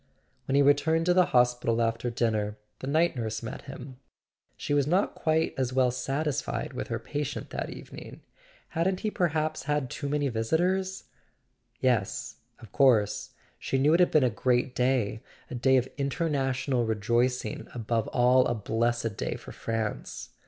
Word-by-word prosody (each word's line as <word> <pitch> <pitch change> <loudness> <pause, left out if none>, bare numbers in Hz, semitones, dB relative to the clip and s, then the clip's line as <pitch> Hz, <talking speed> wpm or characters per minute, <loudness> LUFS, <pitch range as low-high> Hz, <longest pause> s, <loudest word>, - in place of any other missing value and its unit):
When 135 - +1
he 140 - +5
returned 160 +4 +3
to 180 - +4
the 180 0 +4
hospital 125 -2 +2
after 115 +1 0
dinner 110 -3 -1 0.2
the 130 - -6
night 160 +4 +2
nurse 115 -2 -3
met 115 - -7
him. 130 0 -9 0.6
She - - -2
was 145 -1 +2
not 185 +6 +2
quite 160 0 +1
as 130 -1 0
well 130 -1 +3
satis¬ 135 +3 -1
fied - - -4
with - - -4
her - - -2
patient 145 0 -4
that - - -3
evening: - - -10 0.5
hadn't 180 +3 0
he 215 - -1
perhaps 155 -5 -1
had 145 -2 -1
too 145 -1 -4
many 145 0 +1
visitors? 180 +12 0 0.8
Yes, - - 0 0.2
of 110 - -14
course—she 130 0 +1
knew 145 +4 +4
it 170 - +4
had 180 - +5
been 155 - +4
a 125 - +3
great 125 +4 +1
day, 125 -5 0 0.3
a - - -4
day 130 +2 +3
of 125 0 +1
international 135 -3 0
rejoicing, 120 +2 0
above 115 -1 -1
all 125 +1 +4
a 120 - 0
blessed 115 +1 -1
day - - -2
for - - -10
France. 110 -2 -4
130 Hz, 160 wpm, -28 LUFS, 120-150 Hz, 0.8 s, he